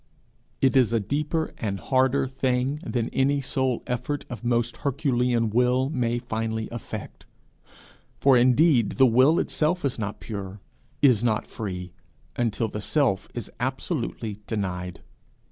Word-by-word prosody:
It 135 Hz, -1 st, +3 dB
is 125 Hz, -4 st, +4 dB
a 115 Hz, -, +3 dB
deeper 150 Hz, -, -1 dB
and 100 Hz, -3 st, -2 dB
harder 130 Hz, +3 st, +2 dB
thing 130 Hz, +1 st, 0 dB
than 120 Hz, -8 st, -2 dB
any 140 Hz, +2 st, +2 dB
sole 130 Hz, -2 st, -1 dB
effort 125 Hz, +4 st, -3 dB
of 120 Hz, -, -7 dB
most 120 Hz, 0 st, 0 dB
herculean 125 Hz, -5 st, +1 dB
will 125 Hz, +4 st, +2 dB
may 120 Hz, -4 st, 0 dB
finally 110 Hz, -2 st, -3 dB
effect. 120 Hz, -1 st, -7 dB, 0.9 s
For 135 Hz, -1 st, +5 dB
indeed 125 Hz, 0 st, +4 dB
the 135 Hz, -, +5 dB
will 130 Hz, +7 st, +5 dB
itself 160 Hz, +2 st, 0 dB
is 130 Hz, -4 st, -1 dB
not 105 Hz, -1 st, -4 dB
pure, 100 Hz, -2 st, -6 dB, 0.4 s
is 125 Hz, -6 st, +5 dB
not 110 Hz, -3 st, +1 dB
free, 90 Hz, -4 st, -6 dB, 0.4 s
until 115 Hz, -1 st, 0 dB
the 105 Hz, 0 st, -5 dB
Self 125 Hz, -5 st, +1 dB
is 120 Hz, -4 st, -5 dB
absolutely 125 Hz, -, -3 dB
denied. 90 Hz, -5 st, -3 dB
125 Hz, 135 wpm, -25 LUFS, 110-135 Hz, 0.9 s, For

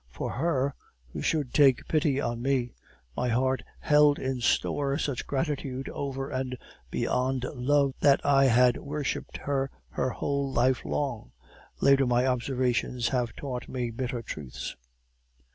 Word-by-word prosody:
For 60 Hz, -, -4 dB
her, 140 Hz, -5 st, 0 dB, 0.4 s
who -, -, -4 dB
should 150 Hz, -6 st, 0 dB
take 135 Hz, -4 st, +4 dB
pity 150 Hz, -3 st, +2 dB
on 120 Hz, -3 st, -2 dB
me, 125 Hz, -2 st, 0 dB, 0.4 s
my 125 Hz, -, 0 dB
heart 130 Hz, +1 st, +1 dB, 0.2 s
held 150 Hz, -1 st, +5 dB
in 130 Hz, -1 st, -3 dB
store 140 Hz, +3 st, +1 dB
such 140 Hz, -5 st, -2 dB
gratitude 135 Hz, -2 st, -2 dB
over 135 Hz, -1 st, -4 dB
and 130 Hz, -1 st, -3 dB, 0.3 s
beyond 130 Hz, -, 0 dB
love, 140 Hz, +1 st, +2 dB
that 140 Hz, -2 st, +5 dB
I 135 Hz, -1 st, +5 dB
had 125 Hz, -1 st, +5 dB
worshiped 145 Hz, 0 st, -4 dB
her 135 Hz, -1 st, -1 dB, 0.2 s
her -, -, -1 dB
whole 140 Hz, +1 st, -2 dB
life 130 Hz, 0 st, +2 dB
long. 135 Hz, -7 st, -3 dB, 0.5 s
Later, 135 Hz, -1 st, +5 dB
my 125 Hz, +1 st, +3 dB
observations 125 Hz, -2 st, 0 dB
have 120 Hz, -2 st, -1 dB
taught 130 Hz, -3 st, -5 dB
me 125 Hz, -2 st, -2 dB
bitter 125 Hz, 0 st, -3 dB
truths. 70 Hz, -, -6 dB
130 Hz, 140 wpm, -28 LUFS, 125-140 Hz, 0.5 s, held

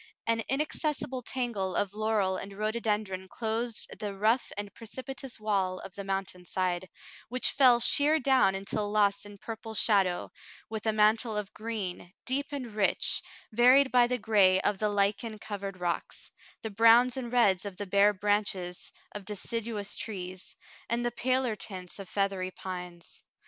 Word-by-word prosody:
An 230 Hz, 0 st, +1 dB
inaccessible 290 Hz, -2 st, -1 dB
tangle 235 Hz, -7 st, -2 dB
of 200 Hz, -1 st, 0 dB
laurel 210 Hz, -3 st, +1 dB
and 195 Hz, +1 st, -6 dB
rhodo 215 Hz, +2 st, -1 dB
dendron 205 Hz, -4 st, -2 dB
clothed 225 Hz, +1 st, -2 dB
the 205 Hz, -2 st, -4 dB
rough 220 Hz, +5 st, +2 dB
and 205 Hz, -1 st, -5 dB
precipitous 260 Hz, +3 st, -7 dB
w^ali 195 Hz, -4 st, 0 dB
of 190 Hz, -, -10 dB
the 200 Hz, -, -6 dB
mountain 195 Hz, -2 st, -3 dB
side, 185 Hz, 0 st, -2 dB, 0.4 s
which 250 Hz, +2 st, +1 dB
fell 255 Hz, -4 st, +6 dB
sheer 295 Hz, +6 st, +4 dB
down 260 Hz, -8 st, +4 dB
until 205 Hz, +2 st, -2 dB
lost 205 Hz, -1 st, +2 dB
in 205 Hz, 0 st, -12 dB
purple 225 Hz, +1 st, -7 dB
shadow, 195 Hz, -5 st, +2 dB, 0.4 s
with 220 Hz, 0 st, -4 dB
a -, -, +4 dB
mantle 215 Hz, +1 st, +3 dB
of 210 Hz, -2 st, -4 dB
green, 205 Hz, -6 st, -5 dB
deep 275 Hz, +2 st, -1 dB
and 255 Hz, -6 st, -5 dB
rich, 210 Hz, -2 st, +1 dB, 0.3 s
varied 255 Hz, +4 st, +6 dB
by 245 Hz, -1 st, +5 dB
the 250 Hz, 0 st, 0 dB
gray 200 Hz, -5 st, +4 dB
of 200 Hz, -, 0 dB
the 215 Hz, -, +1 dB
lichen 205 Hz, +2 st, 0 dB
covered 200 Hz, -3 st, -6 dB
rocks, 175 Hz, -1 st, -3 dB, 0.3 s
the 220 Hz, -, -4 dB
browns 230 Hz, +4 st, +6 dB
and 245 Hz, -3 st, -4 dB
reds 205 Hz, -7 st, +4 dB
of 200 Hz, -3 st, -7 dB
the 205 Hz, -, -4 dB
bare 200 Hz, +2 st, +4 dB
branches 200 Hz, -3 st, -1 dB, 0.2 s
of 205 Hz, -, -7 dB
deciduous 210 Hz, +1 st, -4 dB
trees, 185 Hz, -3 st, -6 dB, 0.3 s
and 235 Hz, +1 st, 0 dB
the 240 Hz, -, +1 dB
paler 255 Hz, -1 st, 0 dB
tints 185 Hz, -3 st, -7 dB
of 195 Hz, -2 st, -8 dB
feathery 195 Hz, -2 st, 0 dB
pines. 180 Hz, -2 st, -8 dB
210 Hz, 160 wpm, -29 LUFS, 195-235 Hz, 0.4 s, fell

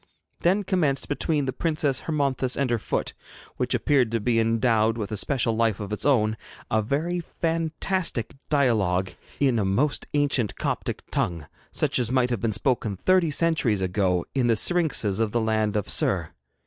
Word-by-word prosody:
Then 190 Hz, +4 st, +2 dB
commenced 160 Hz, -8 st, 0 dB
between 145 Hz, 0 st, -1 dB
the 130 Hz, -, -2 dB
Princess 150 Hz, -3 st, 0 dB
Hermonthis 140 Hz, -5 st, 0 dB
and 140 Hz, -3 st, 0 dB
her 120 Hz, -, +1 dB
foot -, -, -2 dB, 0.4 s
which -, -, 0 dB
appeared 135 Hz, -5 st, +2 dB
to 115 Hz, -, +1 dB
be 115 Hz, +1 st, +1 dB
endowed 115 Hz, 0 st, +2 dB
with 105 Hz, -2 st, -4 dB
a -, -, -1 dB
special 115 Hz, +1 st, 0 dB
life 115 Hz, -3 st, +1 dB
of 105 Hz, 0 st, -5 dB
its 105 Hz, -, 0 dB
own 110 Hz, -6 st, +2 dB, 0.3 s
a 110 Hz, -, +3 dB
very 155 Hz, +10 st, -1 dB, 0.2 s
fantastic 165 Hz, -, -1 dB, 0.2 s
dialogue 105 Hz, -10 st, +1 dB, 0.3 s
in 130 Hz, -5 st, +2 dB
a -, -, +1 dB
most 125 Hz, +10 st, 0 dB
ancient 135 Hz, -9 st, +1 dB
Coptic -, -, -3 dB
tongue, 85 Hz, -3 st, -1 dB, 0.3 s
such -, -, +1 dB
as 120 Hz, -2 st, 0 dB
might 125 Hz, -1 st, +1 dB
have 120 Hz, -, -1 dB
been 115 Hz, -, 0 dB
spoken 110 Hz, -2 st, 0 dB
thirty 185 Hz, -, +3 dB
centuries 150 Hz, -, +1 dB
ago 90 Hz, -1 st, 0 dB
in 130 Hz, -3 st, +1 dB
the 115 Hz, -, +3 dB
syrinxes 130 Hz, -, +1 dB
of 110 Hz, -2 st, 0 dB
the 120 Hz, -, +2 dB
land 110 Hz, -1 st, 0 dB
of 105 Hz, -, -1 dB
Ser. -, -, +1 dB
120 Hz, 175 wpm, -25 LUFS, 110-145 Hz, 0.4 s, a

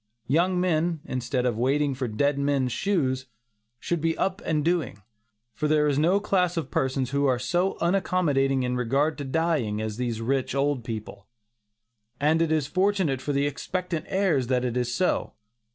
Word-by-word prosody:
Young 175 Hz, +8 st, +2 dB
men 170 Hz, -2 st, +1 dB
instead 125 Hz, 0 st, -2 dB
of 120 Hz, -3 st, 0 dB
"waiting 140 Hz, +3 st, +1 dB
for 130 Hz, -1 st, -3 dB
dead 140 Hz, +6 st, 0 dB
men's 140 Hz, -3 st, +1 dB
shoes" 130 Hz, -, 0 dB, 0.5 s
should 170 Hz, +3 st, -2 dB
be 165 Hz, 0 st, 0 dB
up 190 Hz, +1 st, -1 dB
and 155 Hz, -2 st, 0 dB
doing, 165 Hz, -, -1 dB, 0.5 s
for 150 Hz, -, -1 dB
there 150 Hz, 0 st, +3 dB
is 145 Hz, -1 st, +1 dB
no 175 Hz, +6 st, +3 dB
class 180 Hz, -4 st, +1 dB
of 155 Hz, -5 st, -3 dB
persons 130 Hz, -1 st, 0 dB
who 140 Hz, 0 st, +2 dB
are 130 Hz, -2 st, +2 dB
so 175 Hz, +10 st, 0 dB
unaccommodating 160 Hz, -7 st, +1 dB
in 125 Hz, 0 st, -1 dB
regard 135 Hz, +6 st, +1 dB
to -, -, -3 dB
dying 135 Hz, -7 st, 0 dB
as 110 Hz, -1 st, -4 dB
these 120 Hz, -3 st, -2 dB
rich 130 Hz, +3 st, -1 dB
old 140 Hz, -2 st, 0 dB
people, 110 Hz, -3 st, -7 dB, 0.9 s
and 155 Hz, +3 st, +3 dB
it 165 Hz, -1 st, +1 dB
is 155 Hz, -3 st, +2 dB
fortunate 185 Hz, -4 st, +1 dB
for 145 Hz, -, -2 dB
the 140 Hz, 0 st, +1 dB
expectant 170 Hz, +3 st, -3 dB
heirs 180 Hz, -10 st, +1 dB
that 125 Hz, -1 st, +1 dB
it 125 Hz, -1 st, -2 dB
is 125 Hz, -1 st, 0 dB
so. 180 Hz, +9 st, 0 dB
140 Hz, 175 wpm, -26 LUFS, 125-170 Hz, 0.9 s, there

